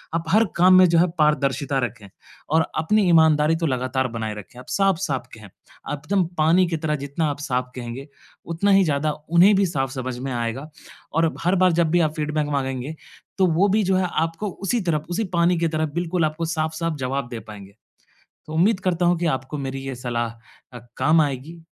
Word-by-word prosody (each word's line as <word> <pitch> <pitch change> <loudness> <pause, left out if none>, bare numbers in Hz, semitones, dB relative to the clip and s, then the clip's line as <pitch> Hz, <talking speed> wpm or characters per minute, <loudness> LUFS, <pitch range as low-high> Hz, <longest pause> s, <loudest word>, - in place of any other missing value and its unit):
आप 165 - -1
हर 215 +5 +4
काम 185 +2 +6
में 185 - +8
जो 165 0 +4
है 175 - +4
पारदर्शिता 140 -2 +1
रखें 115 -4 -4 0.4
और 160 +2 +3 0.2
अपनी 210 +7 +2
ईमानदारी 160 -1 +4
तो 165 - -2
लगातार 130 0 -1
बनाए 110 -2 -4
रखें। 105 +4 -11
आप 125 - -13
साफ़-साफ़ 185 -9 0
कहें। 105 -3 -12 0.4
आप 145 - -4
एकदम 195 -1 +2
पानी 165 +4 +4
की 165 -1 -2
तरह 155 -1 -1
जितना 140 +3 -3
आप 145 - -7
साफ़ 125 -3 -1
कहेंगे, 125 +2 -7 0.4
उतना 170 +5 0
ही 195 0 +6
ज़्यादा 150 0 0 0.2
उन्हें 175 +5 +6
भी 195 0 +3
साफ़ 135 -5 -2
समझ 130 -2 -4
में 135 +1 -4
आएगा। 120 +5 -3 0.4
और 165 +1 +2
हर 180 +3 +2
बार 185 -1 +4
जब 165 -1 +2
भी 175 - +3
आप 155 -2 +1
फ़ीडबैक 150 0 -1
माँगेंगे 135 +1 -3 0.4
तो 190 - +4
वो 175 +4 +3
भी 215 +3 +2
जो 190 0 +1
है 185 -1 +1 0.2
आपको 165 +6 -4 0.2
उसी 240 +5 +1
तरफ 155 -5 -1
उसी 180 +6 -1
पानी 170 +1 +3
की 170 - +1
तरह 155 0 -1
बिल्कुल 175 -1 0
आपको 155 +2 -2
साफ़-साफ़ 160 0 -2
जवाब 135 0 -2
दे 120 -2 -6
पाएँगे। 105 -2 -12 0.7
तो 155 - -7
उम्मीद 190 +5 +2
करता 180 -2 0
हूँ 175 0 +3
कि 170 - -1
आपको 130 +3 -6
मेरी 135 -1 -4
ये 135 - -4
सलाह 120 -1 -3 0.4
अ, 125 - -8 0.2
काम 160 +1 +4
आएगी 145 +4 -4
155 Hz, 205 wpm, -22 LUFS, 135-170 Hz, 0.7 s, में